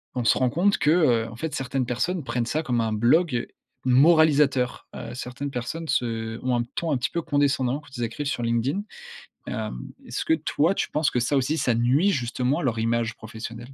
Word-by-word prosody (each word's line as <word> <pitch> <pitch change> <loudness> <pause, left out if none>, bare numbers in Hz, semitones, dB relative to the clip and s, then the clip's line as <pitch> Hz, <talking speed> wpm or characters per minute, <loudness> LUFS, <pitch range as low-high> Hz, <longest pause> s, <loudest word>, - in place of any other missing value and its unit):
on 125 - -1
se - - +4
rend 130 - +2
compte 185 +9 +2
que, 150 - +2
heu, 125 -10 +3
en 115 - -10
fait 160 +6 -4
certaines 135 -1 -2
personnes 145 +8 -1
prennent 120 -2 -2
ça 155 +5 -1
comme 120 -5 0
un 110 - -1
blog 120 +4 +2 0.4
moralisateur. 140 -1 +4
Heu, - - -7
certaines 125 +3 -5
personnes 150 +6 -4
se 115 -3 -1
ont 130 -1 +1
un 120 - +1
ton 165 -2 -2
un 140 - +2
petit 125 - -2
peu 170 - -1
condescendant 140 -3 +1
quand 145 -2 -15
ils 120 - -2
écrivent 115 +6 -4
sur 140 - -2
LinkedIn. 120 - 0 0.7
Hem, - - -4 0.3
est-ce - - -3
que 320 - +2
toi 170 - +1
tu - - -2
penses 150 -1 +1
que 125 - 0
ça 130 +4 +1
aussi, 140 +4 +1
ça 125 - +1
nuit 130 - +3
justement 125 0 0
à - - -4
leur 120 -4 0
image 115 +1 0
professionnelle? 115 +1 -8
130 Hz, 210 wpm, -25 LUFS, 120-150 Hz, 0.7 s, se